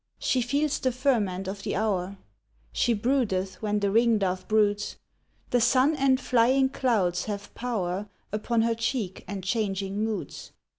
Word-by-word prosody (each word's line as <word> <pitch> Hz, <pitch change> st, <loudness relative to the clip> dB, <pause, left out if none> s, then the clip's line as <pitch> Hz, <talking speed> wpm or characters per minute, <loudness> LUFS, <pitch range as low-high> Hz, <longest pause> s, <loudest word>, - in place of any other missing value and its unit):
She 255 Hz, -, +1 dB
feels 285 Hz, +4 st, 0 dB
the 255 Hz, -, +1 dB
ferment 220 Hz, -8 st, 0 dB
of 195 Hz, +1 st, -5 dB
the -, -, -3 dB
hour: 195 Hz, -2 st, -1 dB, 0.5 s
She 235 Hz, -, +1 dB
broodeth 205 Hz, -5 st, 0 dB
when 210 Hz, -1 st, 0 dB
the 200 Hz, -1 st, +1 dB
ringdove 205 Hz, -5 st, +2 dB
broods; 210 Hz, -1 st, +1 dB, 0.6 s
The 245 Hz, -, +3 dB
sun 265 Hz, +6 st, +4 dB
and 270 Hz, -2 st, +3 dB
flying 260 Hz, +2 st, +3 dB
clouds 215 Hz, -10 st, 0 dB
have 205 Hz, -1 st, -6 dB
power 205 Hz, -5 st, -3 dB, 0.2 s
Upon 225 Hz, +2 st, 0 dB
her 230 Hz, 0 st, +2 dB
cheek 230 Hz, -4 st, -3 dB
and 200 Hz, -2 st, -5 dB
changing 200 Hz, -1 st, -1 dB
moods. 220 Hz, -1 st, -5 dB
215 Hz, 145 wpm, -27 LUFS, 195-245 Hz, 0.6 s, sun